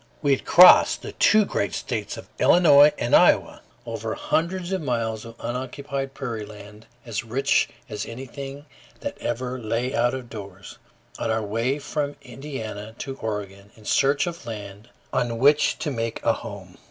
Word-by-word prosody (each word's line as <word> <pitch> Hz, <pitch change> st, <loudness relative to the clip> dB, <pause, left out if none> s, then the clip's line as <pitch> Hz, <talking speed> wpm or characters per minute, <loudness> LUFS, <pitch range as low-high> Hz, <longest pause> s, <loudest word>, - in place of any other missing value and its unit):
We 145 Hz, -, +3 dB
had 135 Hz, -, +1 dB
crossed 180 Hz, +1 st, +7 dB
the -, -, -6 dB
two 215 Hz, -1 st, +4 dB
great -, -, -2 dB
states -, -, -4 dB
of -, -, -10 dB
Illinois 150 Hz, -4 st, +7 dB
and 120 Hz, -, +2 dB
Iowa, -, -, +4 dB, 0.2 s
over -, -, -4 dB
hundreds 175 Hz, +2 st, -1 dB
of 190 Hz, -2 st, -1 dB
miles 115 Hz, -5 st, -2 dB
of 115 Hz, 0 st, -10 dB
unoccupied 135 Hz, +3 st, -4 dB
prairie 120 Hz, -6 st, -4 dB
land 105 Hz, +1 st, -12 dB, 0.2 s
as 115 Hz, -2 st, -3 dB
rich 135 Hz, +5 st, +1 dB, 0.2 s
as 105 Hz, -4 st, -5 dB
anything 135 Hz, +4 st, -8 dB, 0.4 s
that -, -, -4 dB
ever 125 Hz, +1 st, -3 dB
"lay 120 Hz, +3 st, -2 dB
out 120 Hz, -1 st, +1 dB
of 130 Hz, -2 st, -7 dB
doors," 100 Hz, -4 st, -10 dB, 0.4 s
on -, -, -2 dB
our 110 Hz, 0 st, 0 dB
way 115 Hz, +6 st, -1 dB
from 145 Hz, 0 st, -3 dB
Indiana 115 Hz, -5 st, -7 dB
to 135 Hz, +1 st, -5 dB
Oregon 100 Hz, -2 st, -5 dB
in 110 Hz, -, -18 dB
search 140 Hz, +4 st, +2 dB
of 175 Hz, -1 st, -6 dB
land 105 Hz, 0 st, -8 dB, 0.2 s
on 115 Hz, -1 st, 0 dB
which 145 Hz, +5 st, +4 dB
to 150 Hz, -, -3 dB
make 115 Hz, -3 st, -3 dB
a -, -, +4 dB
home. -, -, -9 dB
125 Hz, 165 wpm, -24 LUFS, 110-140 Hz, 0.4 s, crossed